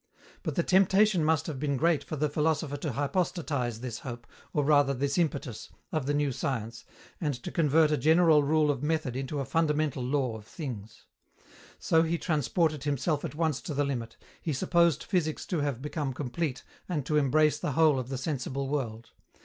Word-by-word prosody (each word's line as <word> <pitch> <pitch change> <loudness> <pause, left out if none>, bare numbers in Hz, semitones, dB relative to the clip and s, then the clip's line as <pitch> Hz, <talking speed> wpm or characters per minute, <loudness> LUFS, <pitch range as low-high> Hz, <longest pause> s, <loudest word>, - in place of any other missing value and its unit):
But - - -3
the 170 - +2
temptation 190 0 +4
must 160 -1 +2
have 150 -5 -5
been 140 -1 0
great 165 +1 +2
for - - -5
the 150 +1 +1
philosopher 150 0 0
to 145 -1 -3
hypostatize 140 - -1
this 125 -3 -5
hope, 120 -2 -7 0.3
or 150 - +1
rather 145 -1 +4
this 140 +5 0
impetus, 140 - -2 0.2
of 155 -6 -1
the 145 - +1
new 145 -1 +1
science, 120 -3 -4 0.4
and 150 -4 0
to - - -5
convert 155 -1 +3
a 150 - +2
general 160 0 +5
rule 150 +1 +3
of 135 -3 -4
method 150 -4 -1
into 135 +2 -3
a 135 - -2
fundamental 150 -4 0
law 130 -2 0
of 110 -1 -11
things. 110 -9 -7 0.7
So 160 - +3
he 165 +1 0
transported 155 -1 0
himself 145 +1 0
at - - -5
once 160 -3 0
to 150 - -5
the 145 - +2
limit; 120 -5 -4 0.2
he 155 - -2
supposed 170 +2 +2
physics 160 -5 -1
to 175 - -2
have 140 -3 -2
become 150 -2 -3
complete 135 +1 -3 0.3
and 150 -7 -2
to 150 +1 +1
embrace 150 +2 +3
the 145 - -2
whole 155 -2 +4
of 130 0 -5
the 135 - -3
sensible 135 -1 -3
world. 120 -6 -3
145 Hz, 190 wpm, -29 LUFS, 135-160 Hz, 0.7 s, general